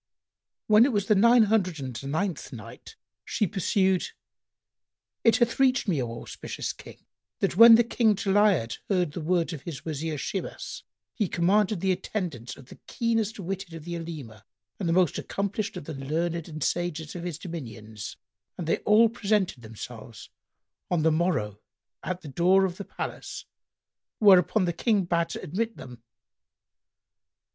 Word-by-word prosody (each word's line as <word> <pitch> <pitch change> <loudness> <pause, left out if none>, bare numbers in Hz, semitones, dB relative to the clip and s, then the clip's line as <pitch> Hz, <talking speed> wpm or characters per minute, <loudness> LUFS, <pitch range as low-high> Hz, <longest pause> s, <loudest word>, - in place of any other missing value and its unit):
When 215 +1 +6
it 270 - +3
was 205 -3 0
the 215 - +4
Nine 235 +3 +6
Hundred 195 -6 +1
and 130 -3 -6
Ninth 180 +3 -2
Night, - - -11 0.3
She 215 - 0
pursued: 190 -1 +1 1.2
It 230 - +5
hath 240 +1 +1
reached 265 -2 +3
me, 160 -8 +1
O 115 -1 -5
auspicious - - -5
King, - - -14 0.3
that - - 0
when 230 +3 +10
the 235 - +5
King 225 -2 +2
Jali'ad 195 - +2
heard 180 -6 +1
the 165 - -6
words 170 +1 0
of 150 - -7
his 160 -4 -8
Wazir 155 0 -3
Shimas, 190 +7 -5 0.3
he 210 - 0
commanded 195 +2 +2
the 190 - +2
attendance 175 - -4
of 135 - -13
the - - -13
keenest 225 -2 0
witted[FN#98] 190 -2 -5
of 160 - -11
the 175 0 -4
Olema 140 -11 -8 0.4
and 170 -3 0
most 180 -2 +2
accomplished 200 0 -3
of 180 - -6
the 160 - -6
learned 160 +4 -2
and 155 -2 -5
sages 165 -3 -2
of 175 - -5
his 175 -4 -4
dominions, 115 - -8 0.4
and 175 - -4
they 165 - +1
all 220 +2 +5
presented 205 - 0
themselves 115 0 -10 0.6
on 175 -3 +1
the 160 - +4
morrow 155 - 0 0.4
at 185 0 -4
the 155 - -10
door 180 +7 +3
of 180 -1 -4
the 200 - -6
palace, - - -6 0.7
whereupon 190 -1 +5
the 175 - -1
King 210 +1 +1
bade 170 -1 0
admit 225 +7 -3
them. 125 -2 -11
180 Hz, 155 wpm, -27 LUFS, 155-205 Hz, 1.2 s, when